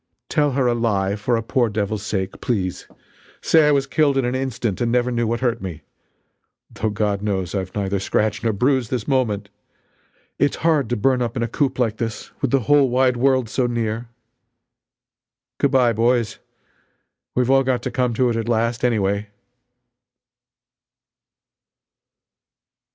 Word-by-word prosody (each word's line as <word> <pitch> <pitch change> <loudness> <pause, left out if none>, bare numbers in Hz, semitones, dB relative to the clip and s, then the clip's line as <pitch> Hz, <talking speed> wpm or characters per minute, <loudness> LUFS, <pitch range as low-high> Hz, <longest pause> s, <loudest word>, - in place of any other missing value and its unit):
Tell 145 -2 +1
her 135 -1 +1
a 120 - +3
lie 100 -4 0
for 110 +3 0
a 115 - -3
poor 120 +1 +1
devil's 105 -1 -2
sake, 95 -2 -3
please. 95 -8 -2 0.5
Say 160 -2 +4
I - - +4
was 140 -2 +2
killed 140 +1 +2
in 135 - +1
an 125 - -1
instant 125 -6 -2
and 120 -1 +1
never 125 0 +1
knew 120 -1 0
what 120 +2 -1
hurt 120 -2 0
me 90 -5 -7 0.9
though 110 - -2
God 105 -1 -1
knows 95 -4 -2
I've 95 -2 -4
neither 100 -1 -1
scratch 110 +3 -1
nor 115 - +2
bruise 125 +3 +1
this 125 -4 -3
moment! 110 -7 0 0.9
It's 145 - +2
hard 150 -7 +2
to 120 - 0
burn 130 +3 +2
up 120 0 -2
in 120 - 0
a - - 0
coop 135 +4 -1
like 115 -4 0
this 115 -1 -5
with 140 - +1
the 135 +1 +2
whole 145 +2 +4
wide 125 0 +2
world 130 -1 +2
so 125 +3 0
near. 115 0 -2 1.5
Good 140 - +3
bye 125 -3 +3
boys 115 0 +1 1.0
we've 125 +1 +2
all 135 0 +5
got 125 -2 0
to - - -3
come 125 -4 0
to 125 0 +2
it - - -2
at 115 0 -2
last, 115 0 0
anyway!" 105 -3 0
120 Hz, 165 wpm, -21 LUFS, 105-130 Hz, 1.5 s, all